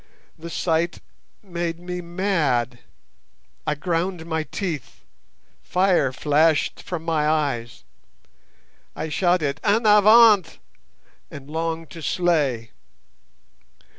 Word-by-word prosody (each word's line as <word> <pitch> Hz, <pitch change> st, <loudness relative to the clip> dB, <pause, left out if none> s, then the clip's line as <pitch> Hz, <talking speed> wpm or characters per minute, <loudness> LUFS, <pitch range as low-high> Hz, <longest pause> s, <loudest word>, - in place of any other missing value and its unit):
The 170 Hz, +1 st, -9 dB
sight 170 Hz, +1 st, -1 dB, 0.4 s
made 170 Hz, -3 st, -4 dB
me 180 Hz, 0 st, -5 dB
mad. 165 Hz, -, -1 dB, 0.9 s
I 150 Hz, -, +1 dB
ground 170 Hz, +2 st, -2 dB
my 160 Hz, -1 st, -2 dB
teeth! 155 Hz, -, -5 dB, 0.6 s
Fire 180 Hz, -7 st, +2 dB
flashed 150 Hz, +3 st, +1 dB
from 175 Hz, -3 st, -6 dB
my 160 Hz, -2 st, 0 dB
eyes! 140 Hz, -7 st, -2 dB, 1.1 s
I 155 Hz, +1 st, -4 dB
shouted 160 Hz, -3 st, +1 dB
'En 220 Hz, +2 st, +2 dB
avant!' 210 Hz, -2 st, +6 dB, 0.7 s
and 140 Hz, +1 st, -11 dB
longed 165 Hz, 0 st, -3 dB
to 165 Hz, -, -9 dB
slay. 150 Hz, -10 st, 0 dB
165 Hz, 95 wpm, -23 LUFS, 150-180 Hz, 1.1 s, avant